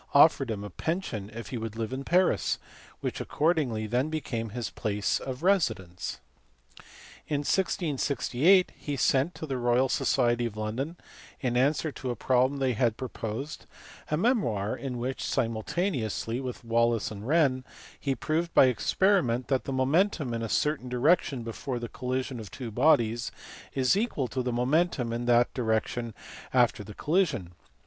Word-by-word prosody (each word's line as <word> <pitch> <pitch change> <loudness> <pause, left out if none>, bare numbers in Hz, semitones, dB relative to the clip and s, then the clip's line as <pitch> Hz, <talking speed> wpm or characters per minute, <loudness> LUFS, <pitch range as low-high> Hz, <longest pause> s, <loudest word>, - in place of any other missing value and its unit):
offered 140 -3 +6
him 105 -2 -3
a 105 - -6
pension 125 - -3
if 115 +1 -7
he 125 - -4
would 110 -1 -5
live 115 +2 -3
in 135 +1 -4
Paris, 180 +5 +2 0.4
which - - -3
accordingly 145 -9 0
then 125 +7 0
became 125 -8 -3
his 115 -1 -4
place 105 -1 -1
of 130 +2 -6
residence. 110 - 0 1.1
In 145 -1 0
1668 160 0 +2
he 145 - -4
sent 135 +6 +2
to - - -5
the 135 -4 -3
Royal 120 +2 +2
Society 120 -2 +2
of 110 -2 -9
London, 125 +10 -3 0.4
in 125 -2 -1
answer 145 +5 +2
to 130 -2 -5
a 120 - -1
problem 130 +4 +2
they 130 -2 +1
had 115 -1 +1
proposed, 130 +4 -5 0.4
a 150 - +1
memoir 120 - +1
in 130 -3 -5
which 130 +2 -3
(simultane 130 - -1
ously 115 +2 -3
with 125 -2 -6
Wallis 115 -1 +2
and 105 +1 -7
Wren) 140 -4 +3 0.4
he 135 -2 -1
proved 160 +6 -1
by - - +8
experiment 130 - +2
that 135 -2 +1
the - - -3
momentum 140 +1 +1
in 115 - -2
a 115 - -3
certain 145 -2 0
direction 130 0 +2
before 120 +3 -4
the 120 0 -4
collision 130 +1 -3
of 110 -3 -8
two 120 -4 -7
bodies 115 -3 +3 0.4
is 130 +4 +3
equal 200 - 0
to 130 +3 -2
the 125 0 -1
momentum 125 0 +1
in 120 +1 -3
that 120 0 +4
direction 115 -1 -1 0.4
after 120 -4 +3
the 105 +1 -10
collision. 150 - 0
125 Hz, 160 wpm, -28 LUFS, 115-150 Hz, 1.1 s, by